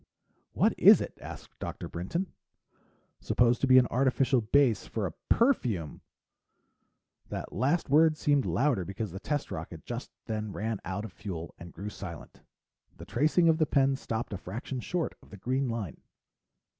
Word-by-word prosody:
"What - - +3
is - - +9
it?" - - -5
asked - - -9
Dr. - - -5
Brinton. 170 - -3 0.9
"Supposed 120 0 +2
to 135 - +3
be 130 0 +7
an 130 - +7
artificial 130 0 +2
base 120 0 +3
for 110 -3 -2
a 85 - -4 0.2
perfume!" 120 - +1 1.3
The - - -4
last 150 +6 +1
word 155 +2 +5
seemed 145 -2 +2
louder 125 -8 +1
because 100 +2 -5
the 95 - -6
test 145 +6 -2
rocket - - -7
just - - -5 0.2
then 110 -2 -3
ran 110 -1 -2
out 95 +3 -3
of 100 - -9
fuel 85 -6 -6
and 85 0 -10
grew 100 +6 -6
silent. 85 -6 -9 0.6
The - - -9
tracing 155 +6 +3
of 160 0 +4
the 155 - +3
pen 135 0 +3
stopped 115 -4 -4
a 95 - -4
fraction 115 +8 -5
short 170 +5 -2
of - - -19
the 105 - -10
green 130 +6 -1
line. 110 - -4
120 Hz, 165 wpm, -29 LUFS, 100-140 Hz, 1.3 s, is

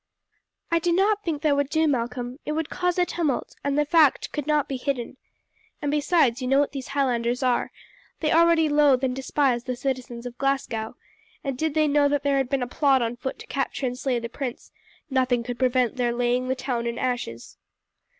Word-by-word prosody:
"I 335 - +3
do 345 +1 0
not 405 +4 +2
think 315 -4 -3
that 300 -2 +3
would 285 -1 0
do, 315 +1 +2
Malcolm; 245 -1 -2
it 300 - -3
would 315 -1 -3
cause 360 -1 0
a 360 - +3
tumult, 325 -7 -2
and 280 0 0
the 295 - +3
fact 305 -2 +3
could 295 -1 -4
not 300 -2 +2
be 275 - -3
hidden. 255 -1 -3 0.6
And 290 -3 -2
besides, 295 -4 +2
you 255 - -2
know 270 +2 +4
what 285 - +1
these 270 -2 -6
Highlanders 250 -2 0
are; 250 -1 +1 0.5
they 310 - 0
already 335 -1 +5
loathe 290 -3 +4
and 255 -1 0
despise 265 -2 0
the 255 - -2
citizens 250 -2 -4
of 245 0 -8
Glasgow, 255 -5 -1 0.5
and 275 -2 -2
did 315 +3 -2
they 310 -1 +3
know 290 0 +3
that 290 -1 0
there 280 -1 +2
had 265 -2 0
been 270 -2 0
a - - -3
plot 270 0 +2
on 230 +1 -2
foot 260 +2 -5
to - - -11
capture 270 0 -2
and 250 -1 -2
slay 255 -1 -1
the 235 0 -4
prince, 245 0 -6 0.4
nothing 255 -2 +1
could 240 0 -6
prevent 255 -1 +1
their 245 -1 +1
laying 245 +1 0
the 260 - 0
town 250 -2 -2
in 235 0 -3
ashes." 240 - -3
270 Hz, 210 wpm, -25 LUFS, 245-295 Hz, 0.6 s, already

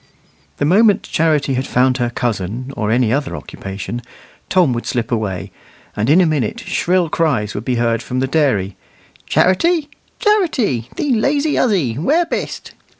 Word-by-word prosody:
The 145 - 0
moment 205 +5 +4
Charity 155 -4 +1
had 130 +1 -2
found 125 +1 +2
her 120 -2 0
cousin, 120 +2 -3
or 105 -4 -2
any 120 0 +2
other 140 0 -1
occupation, 100 +5 -6 0.5
Tom 175 -9 +3
would 120 - -4
slip 120 +1 -2
away; 100 -7 -2 0.4
and 105 +4 -1
in 160 +5 +6
a - - +4
minute 150 -9 -1
shrill 180 0 +1
cries 140 -11 0
would 105 - -5
be 125 - 0
heard 115 -1 +1
from 125 +2 -3
the 130 - +1
dairy, 130 - +1 0.5
"Charity, 300 - +2 0.3
Charity, 305 - +1
thee 285 -3 0
lazy 285 +6 +1
huzzy, 160 - +1
where 310 - +2
bist?" 335 - -4
135 Hz, 155 wpm, -18 LUFS, 115-185 Hz, 0.5 s, in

